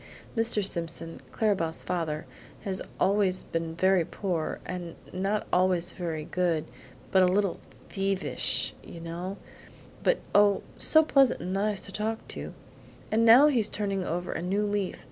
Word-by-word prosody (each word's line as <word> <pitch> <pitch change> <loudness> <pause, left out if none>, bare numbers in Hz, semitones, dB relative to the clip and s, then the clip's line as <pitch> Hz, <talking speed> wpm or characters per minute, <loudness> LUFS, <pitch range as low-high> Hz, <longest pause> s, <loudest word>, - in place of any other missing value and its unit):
Mr. 225 -3 +3
Simpson, 165 -2 -2
Clara 215 -2 +1
Belle's 165 -3 -4
father, 160 -4 -2 0.4
has 190 -2 -1 0.2
always 195 -2 +2
been 165 -1 -4
very 185 0 +3
poor, 170 -2 -3
and 175 -2 -6 0.2
not 195 +3 -1
always 180 -1 +2
very 160 -4 -4
good, 170 -3 0 0.5
a 190 -1 +6
little 185 +1 +1 0.3
bit - - -16
THIEVISH, 195 -1 0
you 170 - -10
know 175 +4 -5 0.6
but - - +3 0.2
oh, 205 -1 +4 0.2
so 315 0 +6
pleasant 275 -4 +3
and 185 - -3
nice 200 0 0
to - - -6
talk 220 +1 -3
to! - - -6 0.6
And 225 +1 +3
now 235 +5 +8
he's 250 -8 +3
turning 200 -2 -1
over 175 +1 -3
a - - -3
new 195 +4 0
leaf. 205 -2 -2
190 Hz, 150 wpm, -28 LUFS, 170-205 Hz, 0.6 s, now